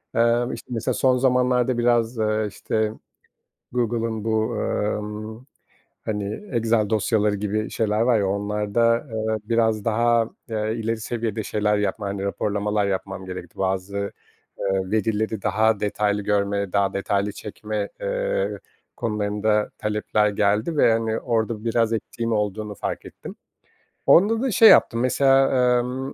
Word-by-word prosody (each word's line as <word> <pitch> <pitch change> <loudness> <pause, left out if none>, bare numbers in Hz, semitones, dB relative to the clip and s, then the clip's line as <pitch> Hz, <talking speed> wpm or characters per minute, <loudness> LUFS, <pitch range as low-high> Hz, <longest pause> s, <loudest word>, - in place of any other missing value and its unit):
Eee, 115 +1 +3
işte, - - -9
mesela 115 -3 -1
son 130 -1 +3
zamanlarda 125 -1 +2
biraz, 120 0 +2
eee, 110 0 0
işte, 110 +2 -1 0.8
Google'ın 115 -2 -1
bu, 110 -1 0
emm, 105 +2 -3 0.6
hani, 105 - -4
Excel 115 -2 +1
dosyaları 105 -1 +1
gibi 105 +1 -2
şeyler 110 -1 0
var 120 -1 +3
ya, 100 - +1
onlarda, 105 +3 +1 0.2
eee, 110 0 -1
biraz 110 -1 +1
daha, 115 0 +2 0.2
eee, 110 0 -1
ileri 115 0 -1
seviyede 110 -2 -3
şeyler 105 0 0
yapma, 100 0 -2
hani, 100 0 -3
raporlamalar 105 0 -1
yapmam 95 0 -4
gerekti. 90 -2 -8
Bazı, 95 +1 -1 0.6
eee, 95 -1 -1
verileri 110 0 -1
daha 110 +1 +2
detaylı 105 0 0
görme, 100 -1 0
daha 100 -1 +2
detaylı 100 +1 -1
çekme, 105 0 -5
eee, - - -1 0.4
konularında 105 -1 0
talepler 105 0 0
geldi 105 +9 0
ve, 120 -5 +5
hani, 110 0 0
orada 115 -2 -1
biraz 115 -1 +1
eksiğim 115 +1 -3
olduğunu 105 0 -2
fark - - -4
ettim. - - -10 0.7
Onda 220 +6 +5
da 265 - 0
şey 220 +1 +8
yaptım, 115 - +5
mesela, 135 +1 +4 0.3
emm, 130 +2 -4
110 Hz, 135 wpm, -23 LUFS, 105-115 Hz, 0.8 s, şey